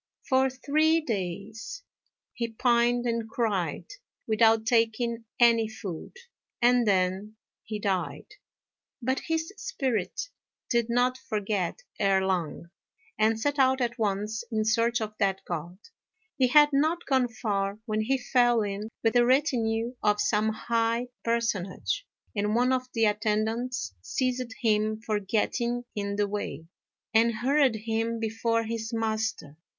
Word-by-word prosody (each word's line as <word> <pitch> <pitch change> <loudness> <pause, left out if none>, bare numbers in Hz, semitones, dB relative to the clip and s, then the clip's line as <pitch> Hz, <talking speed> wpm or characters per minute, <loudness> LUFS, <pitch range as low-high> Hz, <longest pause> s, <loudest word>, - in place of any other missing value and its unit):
For 265 0 +3
three 310 +5 +2
days 220 - -5 0.5
he 235 -3 -2
pined 240 +1 +2
and 230 -2 -1
cried, 210 -7 -1 0.4
without 220 0 +4
taking 230 0 +1
any 230 -2 +5
food, 200 - -7 0.4
and 245 -1 +4
then 190 +2 +1 0.3
he 215 -1 -5
died. 195 -4 -2 0.7
But 260 +2 0
his 325 +3 -1
spirit 265 - -2 0.4
did 235 -1 +2
not 250 +2 +2
forget 210 - -2 0.2
Erh 195 -1 +3
Lang, 170 -2 -2 0.5
and 220 +1 +3
set 285 +5 -1
out 265 0 +4
at 245 0 -1
once 210 +1 -1
in 215 -1 0
search 230 +2 +2
of 215 -1 -3
that 195 -2 +1
God. 175 +1 -5 0.6
He 260 - +3
had 295 +3 +7
not 315 +5 +1
gone 260 -2 +2
far 200 -3 -2
when 215 -2 -1
he 265 +5 +1
fell 240 -3 +3
in 205 +1 -4
with 225 - +3
the 245 -1 +5
retinue 240 -3 +1
of 210 0 +2
some 210 +1 +2
high 230 +2 0
personage, 230 - -1 0.3
and 210 +1 0
one 250 +2 +3
of 255 0 -1
the 225 -1 +3
attendants 215 - -1
seized 255 - -2
him 215 -1 +1
for 215 -1 -1
getting 235 +4 -1
in 200 -1 -3
the 205 0 +1
way, 195 -7 -4 0.5
and 230 0 +4
hurried 265 +2 +3
him 225 +1 -2
before 230 +1 0
his 225 0 -4
master. 220 -9 -2
225 Hz, 135 wpm, -27 LUFS, 210-245 Hz, 0.7 s, had